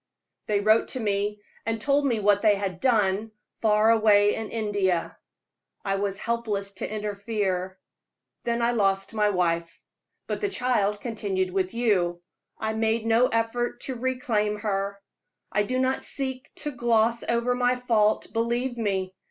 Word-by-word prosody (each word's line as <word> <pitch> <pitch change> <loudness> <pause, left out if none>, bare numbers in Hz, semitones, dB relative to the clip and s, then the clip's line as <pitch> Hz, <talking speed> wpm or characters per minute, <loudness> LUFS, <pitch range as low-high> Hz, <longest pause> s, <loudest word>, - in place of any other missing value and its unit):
They 205 -1 +1
wrote 215 +2 +4
to 260 - -4
me 205 -1 -1 0.2
and 225 0 -2
told 280 +5 +2
me 235 -4 +1
what 205 0 +3
they 215 -2 +5
had 195 -3 -3
done, 215 -3 +2 0.3
far 215 0 +4
away 210 -2 +5
in 220 -1 -4
India. 205 -6 -1 0.7
I 195 0 0
was 195 -1 -2
helpless 215 -3 -2
to - - -4
interfere. 205 -3 -2 0.7
Then 235 0 0
I 235 - +3
lost 195 -3 +1
my 210 -1 +2
wife; 170 -3 -1 0.5
but - - -3
the 405 - 0
child 210 - 0
continued 200 -5 -2
with 190 +2 -1
you. 185 -7 +1 0.4
I 220 0 -2
made 220 0 0
no 230 +2 +4
effort 230 +1 -1
to 265 - -3
reclaim 235 -4 -1
her. 200 -1 -1 0.5
I 210 - +2
do 255 +5 -1
not 260 +1 +1
seek 260 -2 -4
to 295 - -3
gloss 235 -2 +2
over 235 +1 0
my 245 0 +2
fault, 225 -4 +1
believe 240 +2 -1
me. 190 -4 -1
215 Hz, 150 wpm, -26 LUFS, 200-235 Hz, 0.7 s, they